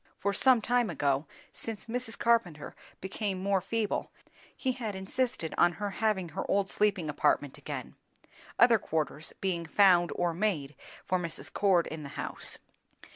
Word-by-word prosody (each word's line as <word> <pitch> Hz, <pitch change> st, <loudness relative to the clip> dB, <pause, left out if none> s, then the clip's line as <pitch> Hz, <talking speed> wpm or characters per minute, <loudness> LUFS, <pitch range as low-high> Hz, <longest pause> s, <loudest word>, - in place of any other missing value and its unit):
For 200 Hz, 0 st, 0 dB
some 245 Hz, +2 st, +5 dB
time 245 Hz, -2 st, +2 dB
ago, 145 Hz, -2 st, 0 dB, 0.3 s
since 225 Hz, -2 st, -5 dB
Mrs. 240 Hz, 0 st, -3 dB
Carpenter 225 Hz, -11 st, +1 dB, 0.3 s
became 190 Hz, +1 st, -2 dB
more 195 Hz, 0 st, +1 dB
feeble, 215 Hz, +2 st, -1 dB, 0.5 s
he 260 Hz, -, 0 dB
had 230 Hz, -5 st, -4 dB
insisted 190 Hz, -3 st, -2 dB
on 175 Hz, 0 st, +5 dB
her 205 Hz, +1 st, -3 dB
having 195 Hz, -4 st, 0 dB
her 175 Hz, +5 st, -4 dB
old 195 Hz, -1 st, +2 dB
sleeping 205 Hz, -6 st, +1 dB
apartment 145 Hz, -1 st, +1 dB
again, -, -, -6 dB, 0.6 s
other 235 Hz, -2 st, +6 dB
quarters 155 Hz, -2 st, -2 dB
being 170 Hz, -4 st, -1 dB
found 175 Hz, -1 st, +5 dB
or 175 Hz, -1 st, 0 dB
made 165 Hz, -7 st, -1 dB, 0.3 s
for 185 Hz, -, +1 dB
Mrs. 170 Hz, -2 st, -6 dB
Cord 190 Hz, -4 st, +3 dB
in 160 Hz, 0 st, -6 dB
the 140 Hz, -, -7 dB
house. -, -, -3 dB
190 Hz, 150 wpm, -30 LUFS, 170-220 Hz, 0.6 s, other